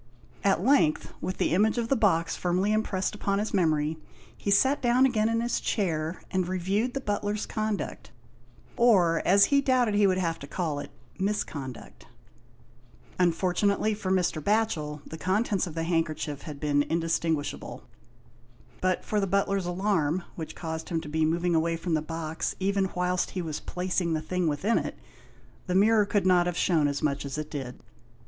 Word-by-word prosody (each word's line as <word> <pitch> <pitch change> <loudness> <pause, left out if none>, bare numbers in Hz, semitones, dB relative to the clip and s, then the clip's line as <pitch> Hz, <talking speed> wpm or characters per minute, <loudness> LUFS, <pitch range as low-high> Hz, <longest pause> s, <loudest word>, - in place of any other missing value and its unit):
At 195 -3 +2
length, 260 - +2
with 185 - -3
the - - +1
image 215 +6 +3
of 230 -1 -1
the 275 - +3
box 165 -8 +2
firmly 185 +4 0
impressed 205 -3 -1
upon 200 -1 -1
his 210 +2 -2
memory, 160 -4 +1 0.4
he - - -4
sat 265 +8 +3
down 245 +2 +4
again 225 -4 +2
in 230 0 +1
his 240 0 0
chair, 165 -5 -2
and 185 -2 0
reviewed 195 +7 -1
the - - 0
butler's 205 -2 -2
conduct, 215 - -3 0.7
or 185 -9 +4
as 200 +2 +6
he 280 - +5
doubted 255 -5 +2
he 205 -1 +4
would 185 -1 +2
have 165 -3 -1
to 140 - -9
call 155 -3 -2
it, - - -7 0.3
misconduct. 160 - -4 1.1
Unfortunately 185 +4 +2
for 205 -2 -4
Mr. 180 -4 +1
Batchel, 160 -9 0
the 160 - -9
contents 195 +1 0
of 165 - -8
the 165 - -1
handkerchief 160 -3 -1
had 145 -2 -8
been 145 -1 +2
indistinguishable. 165 -1 -2 1.0
But 185 -1 0
for 210 - 0
the 195 - 0
butler's 195 -1 0
alarm, 175 -3 0
which 160 -2 -7
caused 160 -1 -5
him 165 - 0
to 155 - -8
be 160 +1 +1
moving 170 +2 +1
away 165 +1 +1
from 165 0 -3
the 155 - +2
box 160 0 -4
even 195 0 +1
whilst 180 0 0
he - - 0
was 155 -2 -4
placing 180 -1 -2
the 155 - -1
thing 180 +1 -1
within 170 +10 +1
it, - - -5 0.7
the 180 - -1
mirror 210 +1 +4
could 200 -2 +1
not 180 -1 +4
have 175 - -2
shewn 160 -5 +2
as 140 -1 -3
much 140 -1 0
as 140 0 -5
it 155 0 -5
did. 130 -4 -6
180 Hz, 175 wpm, -27 LUFS, 160-205 Hz, 1.1 s, as